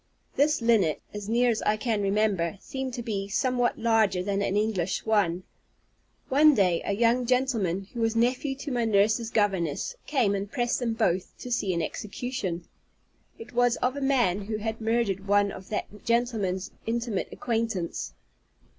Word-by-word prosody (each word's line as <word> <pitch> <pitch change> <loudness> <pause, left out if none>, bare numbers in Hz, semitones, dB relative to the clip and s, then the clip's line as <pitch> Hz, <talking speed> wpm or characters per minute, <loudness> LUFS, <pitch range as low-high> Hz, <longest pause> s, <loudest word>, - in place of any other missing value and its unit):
This 290 -3 +2
linnet, 210 -10 +3
as 210 0 -6
near 240 +1 +3
as 220 - -2
I 210 0 +1
can 220 -2 -1
remember, 200 -3 +1
seemed 265 +1 -5
to 240 - -5
be 200 -4 -3
somewhat 245 +3 +1
larger 220 -5 +2
than 200 +1 -1
an 200 0 0
English 205 -4 0
swan. 195 -5 +1 0.8
One 295 +2 +5
day, 180 -5 +2
a 200 - -1
young 235 +3 +2
gentleman, 230 -8 +1
who 235 - -4
was 225 0 +1
nephew 250 +4 +1
to 280 +1 -6
my 240 -2 0
nurse's 220 +1 +2
governess, 195 - 0
came 250 -9 +2
and 200 +1 -3
pressed 240 -3 0
them 240 -3 -1
both 190 -5 0
to 250 - -8
see 205 -5 +1
an 170 - 0
execution. 195 -3 -4 0.7
It 235 +2 -11
was 245 0 +3
of 255 +2 -1
a 285 - -4
man 240 -8 +2
who 215 +1 -3
had 220 +1 -4
murdered 220 -4 0
one 205 0 +3
of 190 0 -10
that 210 -1 -5
gentleman's 225 -6 0 0.2
intimate 230 -3 -1
acquaintance. 225 -7 -2
220 Hz, 165 wpm, -27 LUFS, 195-240 Hz, 0.8 s, One